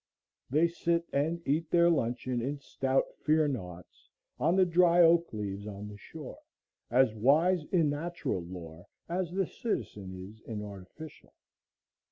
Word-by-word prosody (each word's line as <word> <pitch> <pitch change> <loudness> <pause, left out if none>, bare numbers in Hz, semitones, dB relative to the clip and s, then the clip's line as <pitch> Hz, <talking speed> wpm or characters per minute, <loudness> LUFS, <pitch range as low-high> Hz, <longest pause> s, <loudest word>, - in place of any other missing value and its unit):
They 155 +6 +4
sit 170 0 -1
and 165 +4 -1
eat 155 +3 +1
their 170 0 +5
luncheon 125 -5 0
in 140 +4 -2
stout 135 -1 0 0.2
fear 155 0 +3
naughts 90 -10 -7 0.3
on 170 - +3
the 190 -1 +5
dry 175 0 +5
oak 170 -1 +4
leaves 100 -2 -5
on 105 0 -7
the 105 - -10
shore, 150 +5 -10 0.5
as 125 -1 +4
wise 155 - +3
in 165 -5 +2
natural 155 - -3
lore 85 0 -9 0.2
as 175 0 -1
the 190 +1 0
citizen 95 - -4
is 110 +2 -15
in 105 -2 -4
artificial. 105 +10 -11
140 Hz, 145 wpm, -30 LUFS, 105-170 Hz, 0.5 s, their